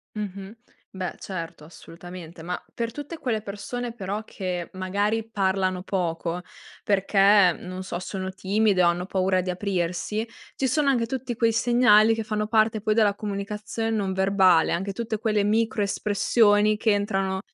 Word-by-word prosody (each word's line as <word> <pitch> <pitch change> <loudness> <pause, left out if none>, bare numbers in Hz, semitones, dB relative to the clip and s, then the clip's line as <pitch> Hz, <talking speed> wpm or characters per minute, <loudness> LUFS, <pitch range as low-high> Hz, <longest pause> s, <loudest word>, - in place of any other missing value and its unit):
Mh-mh. 200 0 -6 0.4
Beh, 185 -3 -5
certo. 170 -5 -7
Assolutamente. 170 +1 -11
Ma 180 +1 -4
per 230 -1 -3
tutte 290 +5 -7
quelle 230 -7 -2
persone 225 +4 -5
però 205 0 -4
che, 180 -4 -5
magari, 205 +4 -1
parlano 190 -3 0
poco 175 -2 -2 0.4
perché, 195 -2 +4
non 185 +1 -7
so, 185 - -4
sono 190 0 -5
timide 195 0 +2
o 175 - +5
hanno 175 +1 -2
paura 185 -1 +1
di 185 - -5
aprirsi, 185 +3 -2 0.3
ci 265 - 0
sono 295 +1 +2
anche 240 -4 +1
tutti 255 0 -4
quei 230 0 +2
segnali 225 -1 +5
che 225 0 -2
fanno 210 0 -2
parte 220 0 +2
poi 215 +1 +1
della 210 -2 +3
comunicazion 210 +2 -3
non 195 -3 -1
verbale, 190 -3 +4
anche 195 +3 -2
tutte 225 0 -3
quelle 215 -2 +1
microespressioni 210 0 +2
che 220 +1 +2
entrano 195 -2 -1
200 Hz, 150 wpm, -25 LUFS, 185-220 Hz, 0.4 s, o